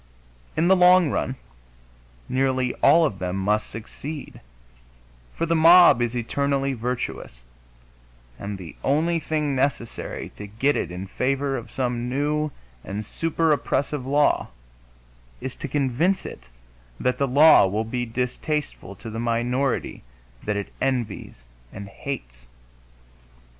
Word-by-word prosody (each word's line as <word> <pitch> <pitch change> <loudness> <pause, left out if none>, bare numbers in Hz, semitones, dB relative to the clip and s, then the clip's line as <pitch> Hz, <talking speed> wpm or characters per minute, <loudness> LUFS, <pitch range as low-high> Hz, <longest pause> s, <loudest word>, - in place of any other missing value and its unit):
In 165 +2 +3
the 190 - +6
long 180 -3 +6
run, 130 - -1 0.9
nearly 130 -1 0
all 165 0 +6
of 100 -10 -3
them 90 0 -3
must 105 +2 0
succeed, 140 +7 -8 0.9
for 165 - -1
the 165 0 +1
mob 165 -4 +7
is 120 0 -1
eternally 140 +3 0
virtuous, 115 - -4 1.0
and 100 0 -5
the 85 -5 -10
only 165 +5 +2
thing 150 -2 -1
necessary 130 -3 -2
to 105 - -7
get 125 +8 +1
it - - -2
in 90 +2 -6
favor 135 +6 -1
of - - -6
some 125 -2 -2
new 150 +3 0 0.3
and 105 +2 -5
super 165 +5 0
oppressive 145 0 0
law 145 +2 +2 0.9
is 130 - -6
to - - -5
convince 145 +7 0
it - - -9 0.5
that 125 0 0
that 140 - +2
law 145 -3 +7
will 105 +4 -1
be 125 +2 -2
distasteful 125 - -3
to 110 - -9
the 115 - -5
minority 120 +3 -1 0.4
that 105 -1 -2
it 100 - -5
envies 120 - -2 0.3
and 100 0 -8
hates. - - -7
130 Hz, 130 wpm, -24 LUFS, 110-150 Hz, 1.0 s, mob